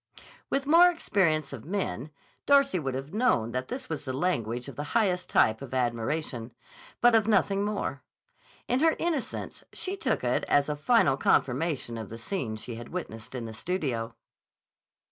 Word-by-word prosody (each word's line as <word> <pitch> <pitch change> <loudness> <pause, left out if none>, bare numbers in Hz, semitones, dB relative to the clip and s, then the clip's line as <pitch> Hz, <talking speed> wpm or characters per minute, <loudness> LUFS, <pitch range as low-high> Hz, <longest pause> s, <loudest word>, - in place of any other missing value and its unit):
With 275 0 0
more 335 +5 +7
experience 165 - +1
of 120 -5 -7
men, 155 - -3 0.4
Darcy 275 -8 +5
would 135 -4 -3
have 135 +5 -6
known 205 - +2
that 130 +1 -3
this 260 - -5
was 160 -3 -4
the 130 - -4
language 120 -8 -1
of - - -8
the 145 - -4
highest 185 -5 +1
type 110 +2 +3
of 130 -1 -6
admiration, 120 0 -1 0.5
but 240 0 +6
of 220 -2 +4
nothing 200 -2 +2
more. 205 0 -2 0.7
In 250 - +1
her 320 +2 +4
innocence 330 -7 -3
she 380 +1 -3
took - - -1
it - - +1
as 145 +1 +3
a 150 - 0
final 150 - +3
confirmation 135 -3 +1
of 110 - -7
the 115 - -7
scene 115 - -3
she 115 +2 -6
had 120 0 -9
witnessed 115 -10 -6
in 120 -2 -4
the 110 - -7
studio. 120 -5 -2
150 Hz, 170 wpm, -28 LUFS, -, 0.7 s, more